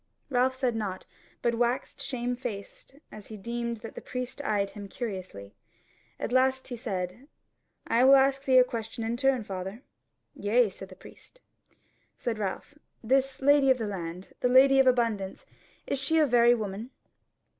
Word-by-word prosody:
Ralph 260 +1 +1
said 250 -3 0
nought, 195 -4 -4 0.4
but 235 - +2
waxed 240 +3 -1
shamefaced 245 -3 -5 0.2
as 210 -2 -11
he 215 - -8
deemed 235 +2 -4
that - - -8
the - - -8
priest 250 +2 -5
eyed 205 -6 0
him 205 -2 -8
curiously. 185 - -6 0.7
At - - -3
last 260 +1 +2
he 245 - -4
said: 205 +1 -5 0.6
"I 235 +2 +3
will 270 +1 +8
ask 270 0 +3
thee 260 -2 +4
a 255 - +9
question 225 -2 -5
in 225 +1 -1
turn, 265 -2 +1
father." 195 +4 -6 0.5
"Yea," 225 +2 +2
said 190 0 -10
the 185 - -12
priest. - - -16 0.8
Said 230 -3 -3
Ralph: 200 +6 -4 0.3
"This 265 +3 +1
lady 285 -1 +5
of 260 - +5
the 225 - -3
land, 180 -2 -6
the 250 - +1
Lady 270 +2 +6
of 265 - +5
Abundance, 230 -6 0 0.4
is 280 - -1
she 280 +4 +1
a 310 - +5
very 240 -2 +5
woman?" 215 +1 -5
240 Hz, 165 wpm, -28 LUFS, 205-260 Hz, 0.8 s, a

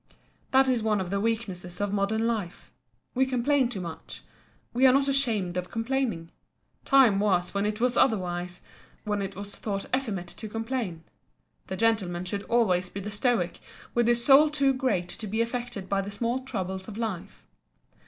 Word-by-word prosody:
That 265 0 +5
is 250 -3 +2
one 215 -1 +1
of 185 -1 -4
the 200 - 0
weaknesses 195 -5 -3
of 205 0 -1
modern 210 +3 +1
life. 210 -6 -3 0.4
We 265 +1 +2
complain 260 +1 +2
too 205 -6 -4
much. 170 -2 -8 0.5
We 255 +2 +5
are - - +7
not 275 +1 +3
ashamed 225 -10 +1
of 180 0 -3
complaining. 225 -8 -2 0.5
Time 255 -8 +5
was 185 -4 +1
when 200 +1 0
it 210 0 -3
was 250 +1 +2
otherwise—when 180 0 -2
it 195 0 -4
was 200 +1 -6
thought 200 -2 -3
effeminate 205 -10 -3
to 215 +3 -6
complain. 225 -7 -3 0.6
The 190 - -4
Gentleman 190 -6 +1
should 200 +2 -3
always 185 -6 +2
be 200 - -6
the 205 +2 -5
Stoic, 205 -5 0 0.3
with 240 -1 +2
his 235 0 +2
soul 285 +3 +7
too 280 -2 +2
great 255 -9 0
to 215 +4 -6
be 220 +3 -2
affected 235 -4 -3
by 195 0 +1
the 195 - -6
small 230 +5 -1
troubles 190 -5 -4
of 215 -1 -8
life. 220 -7 -5
215 Hz, 175 wpm, -27 LUFS, 190-245 Hz, 0.6 s, are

